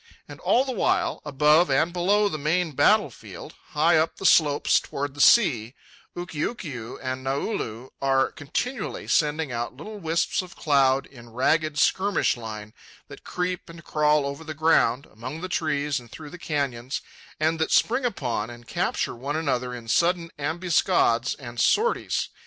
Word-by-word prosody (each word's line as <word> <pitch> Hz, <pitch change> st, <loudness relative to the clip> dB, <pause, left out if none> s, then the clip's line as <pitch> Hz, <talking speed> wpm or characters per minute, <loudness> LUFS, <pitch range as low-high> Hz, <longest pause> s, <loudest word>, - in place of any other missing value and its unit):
And -, -, -11 dB
all 255 Hz, +3 st, +2 dB
the 265 Hz, -, -3 dB
while, 235 Hz, -, 0 dB
above 150 Hz, +3 st, +3 dB
and 150 Hz, +6 st, +2 dB
below 200 Hz, +4 st, +2 dB
the 155 Hz, -6 st, -4 dB
main 165 Hz, +3 st, 0 dB
battle 140 Hz, -, +3 dB
field, -, -, -11 dB, 0.2 s
high 160 Hz, +3 st, +4 dB
up 160 Hz, +1 st, +1 dB
the -, -, -7 dB
slopes 150 Hz, -5 st, +4 dB
toward 140 Hz, 0 st, -5 dB
the 145 Hz, -, -4 dB
sea, 130 Hz, -, +4 dB, 0.4 s
Ukiukiu 155 Hz, -, -5 dB
and 130 Hz, 0 st, -4 dB
Naulu 135 Hz, -, -3 dB
are 135 Hz, -1 st, +2 dB
continually 205 Hz, -, -4 dB
sending 150 Hz, -2 st, +1 dB
out 120 Hz, +1 st, -4 dB
little 210 Hz, +8 st, -8 dB
wisps 165 Hz, 0 st, 0 dB
of 185 Hz, 0 st, -12 dB
cloud, 135 Hz, -3 st, +2 dB
in 120 Hz, -3 st, -15 dB
ragged 155 Hz, +6 st, +1 dB
skirmish 195 Hz, +6 st, +2 dB
line, 110 Hz, -2 st, -8 dB, 0.4 s
that -, -, -12 dB
creep 180 Hz, -1 st, -3 dB
and 165 Hz, 0 st, -11 dB
crawl 150 Hz, -1 st, +2 dB
over 140 Hz, +3 st, -5 dB
the 155 Hz, -1 st, -7 dB
ground, 145 Hz, -4 st, +2 dB
among 130 Hz, +8 st, -8 dB
the 185 Hz, -, -4 dB
trees 150 Hz, -5 st, -1 dB
and 120 Hz, -2 st, -16 dB
through 150 Hz, +1 st, -10 dB
the 180 Hz, -, -10 dB
canyons, 135 Hz, -5 st, -3 dB, 0.4 s
and 160 Hz, +1 st, +1 dB
that 160 Hz, -, 0 dB
spring 250 Hz, +4 st, +3 dB
upon 125 Hz, -, -2 dB
and 120 Hz, 0 st, -12 dB
capture -, -, -1 dB
one 140 Hz, +5 st, -4 dB
another 130 Hz, -6 st, -1 dB
in 120 Hz, -2 st, -8 dB
sudden 170 Hz, +6 st, +1 dB
ambuscades 160 Hz, -5 st, +1 dB
and 120 Hz, -3 st, -9 dB
sorties. 465 Hz, +3 st, +1 dB
150 Hz, 160 wpm, -25 LUFS, 130-170 Hz, 0.4 s, high